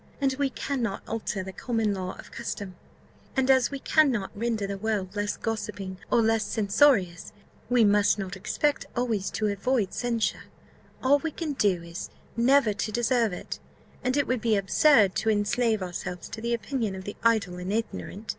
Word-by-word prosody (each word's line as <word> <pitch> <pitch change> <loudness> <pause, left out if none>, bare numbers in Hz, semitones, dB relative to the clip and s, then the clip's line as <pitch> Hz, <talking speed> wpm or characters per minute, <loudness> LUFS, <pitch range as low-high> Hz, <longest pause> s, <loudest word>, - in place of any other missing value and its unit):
"As 270 -2 +1
we 280 0 0
cannot 245 -6 -3
alter 215 -3 -3
the 190 0 -7
common 225 -1 0
law 185 -1 -4
of - - -12
custom, 205 -5 -5 0.6
and 265 0 +4
as 260 -2 +4
we 280 - -4
cannot 265 -8 +2
render 225 -1 -1
the 195 0 -4
world 205 -3 -2
less 205 0 -1
gossiping, 205 -4 -4
or 235 - +4
less 225 0 +2
censorious, 200 - +2 0.4
we 245 -2 +5
must 205 0 +4
not 195 -1 -4
expect 285 +9 -1
always 230 -6 0
to 215 - -2
avoid 210 +1 0
censure; 235 -2 -1 0.6
all 280 +2 +5
we 320 - -2
can 310 -1 -4
do 200 -9 +1
is, 170 +1 -7 0.3
never 240 -1 +4
to 215 +2 -3
deserve 235 -1 +2
it 180 - -6 0.4
and 255 +2 +1
it 285 - +3
would 255 -3 -1
be 225 -1 +2
absurd 200 +1 +4
to 225 - +1
enslave 215 0 +1
ourselves 180 0 -5
to 220 - -7
the 235 +1 0
opinion 225 -2 -2
of 190 - -7
the 205 - -6
idle 215 -6 +2
and 180 +2 -4
ignorant. 220 -1 -4
220 Hz, 175 wpm, -27 LUFS, 195-245 Hz, 0.6 s, we